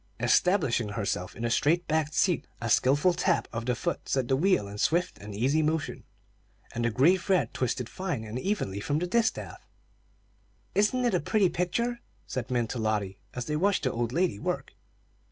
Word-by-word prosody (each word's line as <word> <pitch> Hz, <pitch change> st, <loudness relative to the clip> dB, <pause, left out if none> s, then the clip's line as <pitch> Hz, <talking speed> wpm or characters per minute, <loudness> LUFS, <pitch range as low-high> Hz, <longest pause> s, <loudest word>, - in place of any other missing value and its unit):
Establishing 150 Hz, -, +2 dB
herself 100 Hz, -3 st, -3 dB
in 115 Hz, -, -6 dB
the 120 Hz, -, 0 dB
straight 165 Hz, +8 st, +2 dB
backed 155 Hz, -1 st, 0 dB
seat, 180 Hz, -4 st, +2 dB
a 115 Hz, -1 st, -2 dB
skilful 145 Hz, -, +4 dB
tap 175 Hz, -1 st, +1 dB
of 115 Hz, +1 st, -4 dB
the 125 Hz, -, +1 dB
foot 170 Hz, +8 st, -3 dB
set 130 Hz, -3 st, 0 dB
the 135 Hz, -, +4 dB
wheel 165 Hz, -, +2 dB
in 100 Hz, +1 st, -8 dB
swift 175 Hz, +8 st, +1 dB
and 100 Hz, 0 st, -8 dB
easy 135 Hz, +9 st, +2 dB
motion, 155 Hz, 0 st, -2 dB, 0.7 s
and 120 Hz, -, -2 dB
the 120 Hz, -, +2 dB
gray 140 Hz, -, +4 dB
thread 185 Hz, 0 st, 0 dB
twisted 125 Hz, -1 st, -1 dB
fine 175 Hz, -10 st, -4 dB
and 110 Hz, +3 st, -5 dB
evenly 155 Hz, -, -2 dB
from 145 Hz, +8 st, -1 dB
the 175 Hz, -, 0 dB
distaff. 225 Hz, +5 st, -1 dB, 1.1 s
"Isn't 230 Hz, +5 st, +2 dB
it 240 Hz, -, +2 dB
a 180 Hz, -, +3 dB
pretty 195 Hz, +4 st, +2 dB
picture?" 235 Hz, +9 st, -1 dB, 0.3 s
said 125 Hz, -3 st, -4 dB
Min 120 Hz, -2 st, +1 dB
to 125 Hz, -, -3 dB
Lotty, 105 Hz, -3 st, -1 dB, 0.2 s
as 125 Hz, -1 st, -3 dB
they 150 Hz, -, -2 dB
watched 195 Hz, +5 st, +1 dB
the 130 Hz, -, +1 dB
old 120 Hz, 0 st, -2 dB
lady 170 Hz, -, 0 dB
work. -, -, -3 dB
145 Hz, 190 wpm, -28 LUFS, 115-180 Hz, 1.1 s, skilful